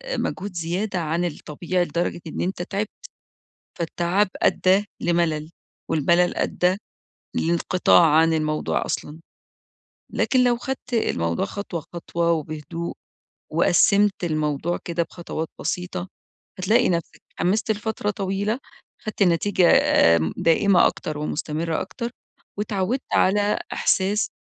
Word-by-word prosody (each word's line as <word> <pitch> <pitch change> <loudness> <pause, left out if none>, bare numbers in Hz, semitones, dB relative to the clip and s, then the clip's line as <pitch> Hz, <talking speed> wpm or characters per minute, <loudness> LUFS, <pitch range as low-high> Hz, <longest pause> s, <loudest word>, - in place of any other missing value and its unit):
مجهود 200 0 -3
زيادة 180 +4 -2
عن 165 +2 -1
الطبيعي 175 +2 -2
لدرجة 175 0 -2
إن 155 - -4
أنت 185 0 -2
تعبت، 200 +4 -2 0.9
فالتعب 175 +4 +1
أدّى 190 +2 +3 0.2
لملل 165 -3 0 0.4
والملل 170 +4 +3
أدّى 180 +1 +1 0.6
لانقطاع 170 +1 +3
عن 165 +1 +5
الموضوع 155 -1 0
أصلًا، 150 +2 -4 0.9
لكن 255 -1 +3
لو 245 -1 +3
خدت 255 0 -6
الموضوع 85 - 0
خطوة 195 -5 -5
خطوة 170 0 -1
وبهدوء 155 +1 -3 0.6
وقسّمت 200 -2 +3
الموضوع 155 +1 -1
كده 170 0 -1
بخطوات 165 -1 -5
بسيطة، 180 0 -3 0.5
هتلاقي 200 +6 +3
نَفسَك 170 -2 -2
اتحمست 210 +5 0
لفترة 215 0 -1
طويلة 200 +3 -1 0.4
خدت 215 -1 -2
النتيجة 180 0 +3 0.5
آمم 80 -1 0
دائمة 175 +3 +4
أكتر 150 -1 -2
ومستمرة 155 +2 -2
أكتر، 235 0 -5 0.5
واتعودت 210 +4 -1
على 205 +2 +3
إحساس 200 +3 +1
175 Hz, 110 wpm, -23 LUFS, 165-200 Hz, 0.9 s, عن